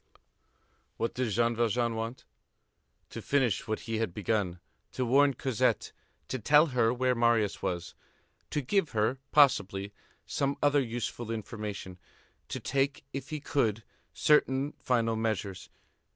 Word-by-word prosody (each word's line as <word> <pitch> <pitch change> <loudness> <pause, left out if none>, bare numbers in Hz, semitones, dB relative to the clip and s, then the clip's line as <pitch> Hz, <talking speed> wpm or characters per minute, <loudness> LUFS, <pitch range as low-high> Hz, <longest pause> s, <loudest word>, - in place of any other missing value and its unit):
What 115 - -1
did 125 -2 -1
Jean 115 +2 +1
Valjean 115 +1 +1
want? 115 +3 -5 0.9
To - - -6
finish 135 -5 +1
what 110 0 -2
he 115 -1 -3
had 110 -7 -2
begun; 100 -4 -1 0.3
to 130 - -1
warn 140 +2 +4
Cosette, 125 -3 0 0.4
to 130 - -3
tell 150 +7 +5
her 115 -2 +3
where 125 +1 +1
Marius 115 -4 +2
was, 85 -1 -3 0.6
to 150 - -1
give 165 +5 0
her, 110 +4 +1
possibly, 100 -9 +3 0.3
some 140 0 -1
other 145 -1 +3
useful 120 -1 -4
information, 105 -4 -5 0.5
to - - -3
take, 140 +1 -1
if 135 0 -5
he 155 - -3
could, 115 -7 0 0.3
certain 140 -1 +3
final 115 -3 +1
measures. 105 -4 -3
115 Hz, 135 wpm, -30 LUFS, 110-135 Hz, 0.9 s, tell